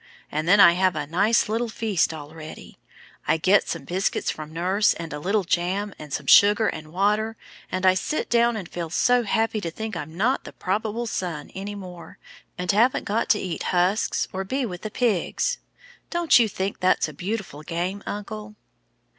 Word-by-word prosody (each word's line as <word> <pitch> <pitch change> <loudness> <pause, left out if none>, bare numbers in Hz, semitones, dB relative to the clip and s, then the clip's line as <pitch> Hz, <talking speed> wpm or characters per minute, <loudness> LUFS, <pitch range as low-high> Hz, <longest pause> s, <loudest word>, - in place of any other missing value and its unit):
And 155 +2 -2
then 200 +3 +6
I 170 - +9
have 185 0 +2
a 150 -1 -2
nice 200 +9 +2
little 225 +2 -1
feast 220 -6 0
all 155 -1 -9
ready. 155 -1 -11 0.5
I - - +3
get 190 +5 +3
some - - -3
biscuits 185 +3 -1
from 155 0 -8
nurse, 185 +6 +2
and 165 -2 -7
a 150 - -4
little 200 +6 +1
jam, 185 +4 -1
and 150 -2 -10
some 145 - -3
sugar 205 +8 +6
and 155 0 -5
water, 210 +4 +1 0.3
and 185 0 -1
I 185 - +7
sit 190 +11 -2
down 235 -1 +3
and 190 -5 -6
feel 170 -1 -5
so 245 +8 +3
happy 225 0 0
to 170 - -3
think 220 +4 -6
I'm 160 +1 -7
not 250 +8 +1
the - - -10
probable 215 +4 -2
son 175 -9 -4
any 200 +2 -6
more, 180 -3 -10 0.4
and 180 0 0
haven't 230 +6 +3
got 220 +3 -1
to 210 - +4
eat 180 -3 -4 0.2
husks 185 +5 +1
or 190 +1 -2
be 260 +7 -2
with 180 -5 -6
the 215 - -4
pigs. 240 - 0 0.5
Don't 345 -6 +4
you 225 -2 +3
think 195 0 -3
that's 185 -2 +2
a 155 - -9
beautiful 185 -2 -5
game, 175 +5 -3
uncle?" 210 +1 -6
195 Hz, 190 wpm, -24 LUFS, 170-215 Hz, 0.5 s, I